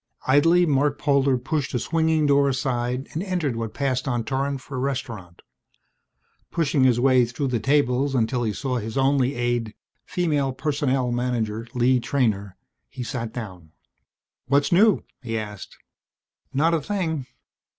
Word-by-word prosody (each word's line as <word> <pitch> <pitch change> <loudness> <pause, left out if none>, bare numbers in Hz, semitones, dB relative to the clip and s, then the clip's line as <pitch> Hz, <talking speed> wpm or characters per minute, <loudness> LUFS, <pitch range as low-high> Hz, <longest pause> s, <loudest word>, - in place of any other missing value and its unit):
Idly 165 +6 +4
Marc 145 -2 +1
Polder 140 -3 +2
pushed 130 +1 -2
a - - +1
swinging 160 +1 +1
door 140 -1 +4
aside 125 -1 -2
and 160 - -2
entered 180 - -1
what 115 -2 -4
passed 130 -2 -1
on 120 -3 0
Torran 135 +2 -1
for 130 +1 -8
a - - -1
restaurant. 125 -10 -4 1.1
Pushing 150 -5 +1
his 125 -2 +3
way 130 -1 +5
through 125 +4 -2
the 120 -2 0
tables 135 0 +1
until 120 +1 +1
he 110 -3 0
saw 125 +4 -2
his 110 +1 -4
only 135 0 +2
aide, 120 -2 -1 0.3
Female 150 -7 0
Personnel 135 -2 0
Manager 120 -2 -2
Lee 125 +1 +3
Treynor, 110 -7 -1 0.3
he 125 - -6
sat 120 -2 -4
down. 90 -10 -8 0.7
"What's 140 +2 +2
new?" 200 +3 +4 0.2
he 115 -3 -3
asked. 105 -3 -7 0.7
"Not 160 +5 +2
a 165 - +1
thing." 160 -7 -2
130 Hz, 150 wpm, -24 LUFS, 120-145 Hz, 1.1 s, way